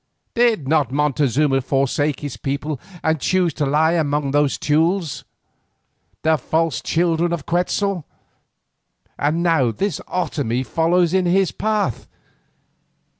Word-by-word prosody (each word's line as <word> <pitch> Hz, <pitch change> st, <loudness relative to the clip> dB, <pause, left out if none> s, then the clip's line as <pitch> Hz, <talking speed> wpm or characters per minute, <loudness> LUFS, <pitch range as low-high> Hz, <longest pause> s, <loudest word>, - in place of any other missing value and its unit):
Did 230 Hz, -, +2 dB
not 145 Hz, -4 st, +2 dB
Montezuma 140 Hz, -1 st, +1 dB
forsake 140 Hz, +2 st, 0 dB
his 145 Hz, -4 st, -5 dB
people 140 Hz, 0 st, -4 dB, 0.2 s
and 160 Hz, -1 st, +1 dB
choose 180 Hz, -1 st, +1 dB
to 145 Hz, -1 st, -1 dB
lie 155 Hz, +3 st, +3 dB
among 150 Hz, -4 st, 0 dB
these 145 Hz, -1 st, +2 dB
Teules, 160 Hz, +2 st, 0 dB, 1.0 s
the 160 Hz, -1 st, +3 dB
false 160 Hz, 0 st, 0 dB
children 170 Hz, 0 st, +1 dB
of 170 Hz, -5 st, -3 dB
Quetzal? 180 Hz, +1 st, 0 dB, 1.2 s
And 155 Hz, +4 st, 0 dB
now 165 Hz, -8 st, +3 dB
this 160 Hz, -, -2 dB
Otomie 130 Hz, -8 st, -1 dB
follows 170 Hz, +4 st, +2 dB
in 185 Hz, -1 st, +2 dB
his 190 Hz, +1 st, +2 dB
path. 210 Hz, -, -1 dB
155 Hz, 120 wpm, -20 LUFS, 140-175 Hz, 1.2 s, lie